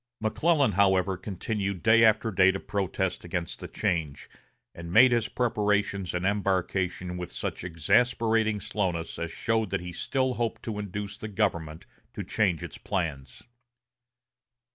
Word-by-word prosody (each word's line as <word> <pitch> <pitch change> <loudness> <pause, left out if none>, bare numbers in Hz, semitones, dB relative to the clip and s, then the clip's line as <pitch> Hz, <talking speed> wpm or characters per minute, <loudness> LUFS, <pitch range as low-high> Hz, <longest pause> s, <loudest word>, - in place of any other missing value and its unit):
McClellan, 140 +5 +2
however, 95 -1 +3
continued 100 0 -4
day 115 +1 +6
after 110 +1 +4
day 95 0 +5
to 95 +1 0
protest 95 -2 -2
against 85 -1 -4
the - - -7
change, 75 -5 -2 0.5
and 85 0 -8
made 120 +6 +7
his 120 -2 +1
preparations 105 -5 0
and 90 +1 -1
embarkation 95 -2 -1
with 90 -1 -6
such - - -4
exasperating 110 +5 +2
slowness 95 -5 -3
as 85 - -3
showed 110 +4 -1
that 95 - -1
he 90 0 -6
still 130 +7 -1
hoped 115 -2 -3
to 110 -2 -4
induce 100 0 -5
the 110 - -5
government 85 -7 -2 0.3
to - - -4
change 90 -7 0
its - - -8
plans. 75 -9 -4
100 Hz, 140 wpm, -27 LUFS, 90-110 Hz, 0.5 s, made